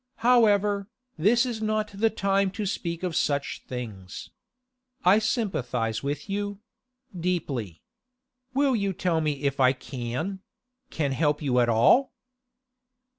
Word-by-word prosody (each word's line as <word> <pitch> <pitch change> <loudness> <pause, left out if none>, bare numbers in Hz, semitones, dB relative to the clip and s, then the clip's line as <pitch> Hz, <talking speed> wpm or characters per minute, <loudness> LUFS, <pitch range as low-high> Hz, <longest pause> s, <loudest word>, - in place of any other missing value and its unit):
However, 205 -5 +4 0.3
this 225 +10 +3
is 235 -3 -4
not 215 0 0
the 220 +3 +2
time 195 -2 +1
to 205 +1 -3
speak 170 -3 -3
of 180 -3 -2
such 140 -1 0
things. 110 -7 -7 0.7
I 190 +4 +6
sympathise 135 - -1
with 145 +3 -4
you—deeply. 195 - -5 0.7
Will 275 -2 +3
you 200 -3 0
tell 170 -2 0
me 150 -2 -2
if 140 -1 0
I 130 0 +5
can—can 130 +9 -5 0.7
help 150 +2 +1
you 125 -3 +2
at 120 -1 +3
all? 120 - +4
180 Hz, 120 wpm, -26 LUFS, 135-215 Hz, 0.7 s, I